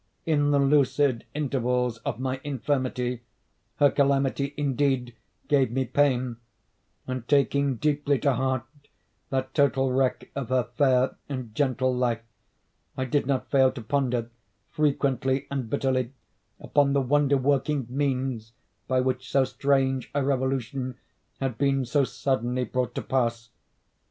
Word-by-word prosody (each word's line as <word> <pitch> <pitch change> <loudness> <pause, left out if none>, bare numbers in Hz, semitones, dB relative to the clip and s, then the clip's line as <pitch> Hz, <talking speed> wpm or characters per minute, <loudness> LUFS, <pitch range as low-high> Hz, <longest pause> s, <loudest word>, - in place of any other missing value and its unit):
In 145 -3 +2
the 145 - +3
lucid 140 -2 +2
intervals 125 -4 0
of 115 - -4
my 130 0 -2
infirmity, 130 -3 -2 0.5
her 145 -1 +4
calamity, 140 0 +1
indeed, 135 -4 0 0.3
gave 140 -4 +3
me 130 +3 -1
pain, 130 -3 +1 0.7
and, 130 -2 -5
taking 140 -1 +2
deeply 145 +1 +1
to 140 0 +2
heart 130 0 0 0.7
that 130 0 -2
total 135 -2 +2
wreck 130 0 0
of 135 -4 -4
her 130 -1 +2
fair 130 -1 +3
and 130 -5 -5
gentle 130 0 +1
life, 120 -2 0 0.7
I 130 - -1
did 130 +1 0
not 135 -2 -1
fail 130 -2 +5
to 125 - -7
ponder, 125 -2 -1 0.4
frequently 135 -3 +1
and 135 -5 -3
bitterly, 130 -1 0 0.5
upon 140 -1 +2
the 140 - +3
wonder 140 +1 +3
working 140 0 +1
means 130 -4 -2 0.3
by 130 -1 +2
which 130 0 -2
so 135 - +3
strange 135 0 0
a 145 - +2
revolution 130 -1 -1 0.4
had 130 -4 -3
been 135 -1 +2
so 140 +3 +2
suddenly 125 -1 -1
brought 125 0 -2
to - - -3
pass. 115 -3 -1
130 Hz, 135 wpm, -26 LUFS, 125-140 Hz, 0.7 s, fail